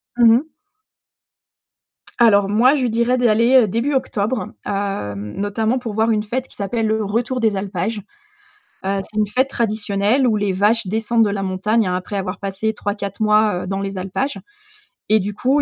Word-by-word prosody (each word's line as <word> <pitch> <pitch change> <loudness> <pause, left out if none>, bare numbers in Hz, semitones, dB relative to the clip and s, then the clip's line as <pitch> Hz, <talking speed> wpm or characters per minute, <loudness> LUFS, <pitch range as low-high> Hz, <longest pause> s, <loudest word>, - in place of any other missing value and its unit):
Mmh 235 -2 +6
mh. 260 +7 +1 1.7
Alors 205 -4 +5
moi, 235 +6 +4
je 260 -4 0
dirais 235 +2 +1
d'aller, 235 +1 +3
heu, 250 -4 +6
début 235 +8 -1
octobre, 250 -2 -1 0.2
heu, 195 - -2
notamment 205 - -2
pour 235 -4 -5
voir 220 +2 +1
une 215 -2 +1
fête 255 +5 -3
qui - - -18
s'appelle 220 +3 -2
le 220 0 0
retour 235 +5 -1
des 220 -3 +1
alpages. 195 +2 -3 0.8
Heu, 195 +1 0
c'est 210 - -13
une 210 -1 +1
fête 260 +6 +1
traditionnelle 215 +1 0
où 225 -3 +2
les 205 -2 0
vaches 210 +4 +2
descendent 225 +2 +1
de 205 - 0
la 200 -1 -2
montagne, 205 +4 0
hein, 180 - -1
après 185 +3 -4
avoir 190 -1 -4
passé 200 +2 -2
3-4 200 0 -4
mois, 210 -3 +3
heu, - - -7
dans 195 0 -2
les 195 0 -4
alpages, 195 +10 -3 0.7
et 215 0 +5
du 205 +1 -3
coup, 265 +7 +1
215 Hz, 180 wpm, -20 LUFS, 200-235 Hz, 1.7 s, Mmh